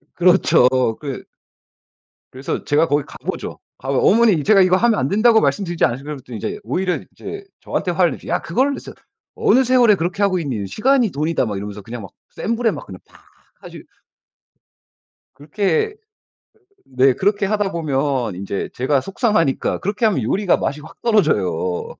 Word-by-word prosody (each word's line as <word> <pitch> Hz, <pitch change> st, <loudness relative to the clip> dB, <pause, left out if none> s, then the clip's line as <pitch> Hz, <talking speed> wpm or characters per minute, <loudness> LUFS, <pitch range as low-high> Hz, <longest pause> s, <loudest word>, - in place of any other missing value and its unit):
그렇죠. 175 Hz, -8 st, +4 dB, 0.3 s
그 140 Hz, -4 st, -6 dB, 1.1 s
그래서 130 Hz, +2 st, -5 dB
제가 150 Hz, +3 st, +2 dB
거기 145 Hz, 0 st, +1 dB
가 -, -, -13 dB
보죠. -, -, -5 dB, 0.2 s
가면 135 Hz, 0 st, -1 dB
"어머니 210 Hz, -8 st, +4 dB
제가 205 Hz, -2 st, +5 dB
이거 185 Hz, 0 st, +4 dB
하면 230 Hz, 0 st, +2 dB
안 130 Hz, -, 0 dB
된다고 220 Hz, +4 st, +4 dB
말씀드리지 175 Hz, -4 st, 0 dB
않았습니까." 125 Hz, +4 st, -1 dB
그러면 150 Hz, -3 st, -6 dB
또 125 Hz, -, -9 dB
이제 105 Hz, -, -4 dB
오히려 180 Hz, -, -1 dB
이제 400 Hz, -1 st, -8 dB, 0.2 s
저한테 180 Hz, -, -2 dB
화를 170 Hz, -3 st, +2 dB
내죠. -, -, -10 dB
"야 -, -, 0 dB
그걸 255 Hz, +11 st, 0 dB
어느 280 Hz, -, -3 dB
세 -, -, -10 dB, 0.4 s
어느 425 Hz, -, +3 dB
세월에 245 Hz, -3 st, +5 dB
그렇게 185 Hz, +2 st, -2 dB
하고 195 Hz, -2 st, +2 dB
있니. 125 Hz, -, -3 dB
시간이 245 Hz, -, +2 dB
돈이다." 155 Hz, -2 st, -1 dB
막 105 Hz, -2 st, -3 dB
이러면서 105 Hz, +1 st, -6 dB
그냥 115 Hz, +3 st, -8 dB
막 95 Hz, -, -10 dB, 0.2 s
센 230 Hz, -, -3 dB
불에 230 Hz, -1 st, +1 dB
막 -, -, -7 dB
그냥 95 Hz, -2 st, -10 dB
팍 -, -, -20 dB, 0.4 s
하시 -, -, -11 dB, 1.5 s
그렇게 175 Hz, -, -1 dB, 0.9 s
네, 130 Hz, 0 st, +3 dB
그렇게 200 Hz, +7 st, 0 dB
하다 205 Hz, -1 st, 0 dB
보면 135 Hz, -, -1 dB
인제 100 Hz, +1 st, -4 dB
제가 135 Hz, +2 st, +1 dB
속상하니까 195 Hz, -, 0 dB
그렇게 210 Hz, +4 st, -1 dB
하면 190 Hz, -, +1 dB
요리가 185 Hz, -, +1 dB
맛이 145 Hz, +2 st, -3 dB
확 150 Hz, -, -14 dB
떨어져요. 105 Hz, -, +1 dB
170 Hz, 365 characters per minute, -19 LUFS, 130-210 Hz, 1.5 s, 제가